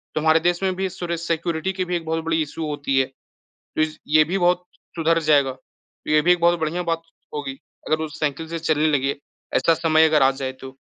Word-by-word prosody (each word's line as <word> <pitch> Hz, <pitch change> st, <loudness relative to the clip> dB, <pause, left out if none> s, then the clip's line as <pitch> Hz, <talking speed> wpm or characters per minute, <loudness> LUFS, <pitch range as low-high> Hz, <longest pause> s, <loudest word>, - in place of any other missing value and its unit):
तो 155 Hz, -, 0 dB
हमारे 160 Hz, +1 st, +4 dB
देश 175 Hz, +2 st, +1 dB
में 190 Hz, -1 st, +1 dB
भी 190 Hz, +1 st, -1 dB
सुर 175 Hz, -2 st, -4 dB
सिक्योरिटी 170 Hz, +1 st, -2 dB
की 185 Hz, -1 st, -2 dB
भी 180 Hz, 0 st, -2 dB
एक 165 Hz, -, -8 dB
बहुत 160 Hz, 0 st, -2 dB
बड़ी 165 Hz, 0 st, +1 dB
इश्यू 155 Hz, +1 st, -4 dB
होती 145 Hz, -2 st, -1 dB
है, 130 Hz, -, +3 dB
तो 135 Hz, 0 st, -25 dB, 0.5 s
इस 155 Hz, 0 st, -1 dB
ये 155 Hz, +1 st, +5 dB
भी 180 Hz, +5 st, -2 dB
बहुत 180 Hz, 0 st, +2 dB, 0.3 s
सुधर 165 Hz, 0 st, +2 dB
जाएगा, 140 Hz, -3 st, +4 dB
तो 130 Hz, +3 st, -12 dB
ये 155 Hz, 0 st, +5 dB
भी 175 Hz, -, +4 dB
एक 175 Hz, -, -2 dB
बहुत 170 Hz, 0 st, +4 dB
बढ़िया 170 Hz, +3 st, -1 dB
बात 165 Hz, -1 st, -1 dB, 0.3 s
होगी 135 Hz, -2 st, -4 dB, 0.3 s
अगर 155 Hz, -, +2 dB
वो 160 Hz, -, -2 dB
साइकिल 150 Hz, +1 st, -2 dB
से 165 Hz, 0 st, -3 dB
चलने 155 Hz, -1 st, +1 dB
लगे, 135 Hz, +1 st, -1 dB, 0.4 s
ऐसा 165 Hz, -, +4 dB
समय 160 Hz, 0 st, +4 dB
अगर 155 Hz, -3 st, +4 dB
आ 135 Hz, -, +5 dB
जाए 135 Hz, 0 st, -4 dB
तो। 135 Hz, 0 st, -9 dB
160 Hz, 230 wpm, -22 LUFS, 150-170 Hz, 0.5 s, ये